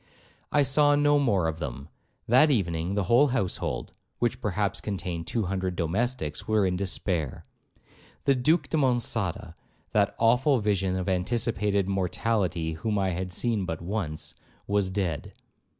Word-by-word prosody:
'I 145 - +4
saw 145 +2 +4
no 145 0 +4
more 100 -11 +2
of 80 0 -3
them,—that 80 - 0
evening 90 - 0
the 105 - +1
whole 120 +10 +5
household, 120 -9 -2 0.3
which 120 -1 -1
perhaps 100 0 -1
contain 90 -5 -4
two 110 +6 -1
hundred 95 -1 -2
domestics, 90 - -2
were 110 -2 +3
in 90 -1 0
despair. 90 -5 -2 0.8
The 140 - +5
Duke 145 +4 +2
de 160 - -1
Monçada, 115 - 0 0.4
that - - +2
awful 125 +4 +3
vision 95 -3 0
of 95 0 -3
anticipated 100 0 0
mortality 95 -3 0
whom 105 +6 -2
I 95 -1 +1
had 90 +1 -3
seen 110 +2 0
but 80 -2 -4
once, 85 -4 -4 0.3
was 100 -2 +1
dead. 95 -6 -3
100 Hz, 140 wpm, -27 LUFS, 90-120 Hz, 0.8 s, whole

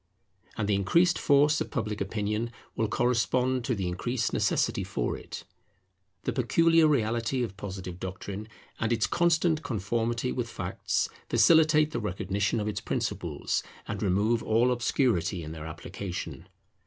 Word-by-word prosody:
And 105 - -1
the 105 - +2
increased 165 - +3
force 145 +1 +4
of - - -2
Public 105 -3 -3
Opinion 105 +3 -2 0.2
will 110 - +1
correspond 125 +2 +1
to 125 - 0
the 95 -3 -2
increased 115 +7 -1
necessity - - +1
for - - -2
it. - - -8 0.8
The - - -1
peculiar 165 +6 +4
reality 120 -2 +1
of 100 -5 -5
Positive 95 -3 -7
doctrine 95 +3 -6 0.3
and 115 0 0
its 115 -2 +2
constant 170 -2 +2
conformity 115 - -1
with 120 -2 -3
facts - - -1 0.2
facilitate 155 -2 +5
the - - -2
recognition 100 +1 -1
of 105 - -2
its 105 - -2
principles, - - -2 0.3
and - - -4
remove 105 +5 +2
all 115 +3 +3
obscurity 110 - +1
in 75 - -7
their 80 -1 -7
application. 90 +1 -6
115 Hz, 140 wpm, -28 LUFS, 100-130 Hz, 0.8 s, facilitate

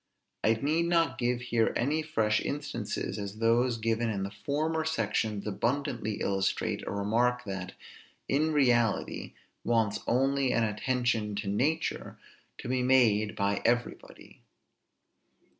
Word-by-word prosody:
I 110 - +4
need 155 +8 0
not 170 -1 +1
give 120 0 0
here 115 -2 +1
any 145 +6 +1
fresh 110 -9 +1
instances, 120 -7 -3
as 100 +1 -6
those 115 +2 +2
given 115 +1 0
in 100 -3 -2
the 100 - -4
former 150 +10 -1
sections 110 -7 -1
abundantly 115 0 -2
illustrate 95 -1 0
a - - -2
remark 120 +5 +1
that, 95 -3 -5 0.5
in 155 +4 +1
reality, 120 -7 +1 0.3
wants 115 -3 +1
only 135 +1 +2
an 115 - +2
attention 115 -1 0
to 105 0 -4
nature, 135 +11 -1 0.4
to - - -8
be 130 0 0
made 115 -5 +3
by 100 -1 0
everybody. 120 0 -2
120 Hz, 125 wpm, -29 LUFS, 105-130 Hz, 0.5 s, I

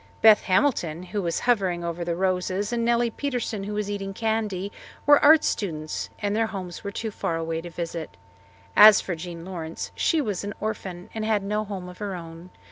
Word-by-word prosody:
Beth 220 -1 +8
Hamilton, 185 - +1
who 200 +3 -3
was 170 -2 -1
hovering 190 -8 +1
over 170 0 -3
the 170 0 -1
roses, 185 +3 0
and 235 -1 0
Nellie 235 0 +2
Preston, 240 -7 -3
who 210 +1 -4
was 210 -1 -1
eating 195 -1 -4
candy, 215 -3 -1 0.3
were 290 0 +6
art 310 +1 +8
students, 155 -6 -2
and 205 0 -1
their 225 0 +2
homes 185 -5 -6
were 200 - -3
too 220 +2 -4
far 170 - -2
away 165 0 -2
to 175 - -8
visit. 165 -9 -5 0.6
As 210 -1 +10
for 185 - -3
Jean 170 0 -7
Lawrence, 170 -3 -6
she 325 - +1
was 210 -10 -2
an 205 0 -5
orphan, 185 -4 -5
and 220 - -3
had 215 -2 +1
no 210 +2 -1
home 195 -3 -6
of 180 0 -11
her 200 -2 -3
own. 165 +1 -9
195 Hz, 200 wpm, -25 LUFS, 175-215 Hz, 0.6 s, As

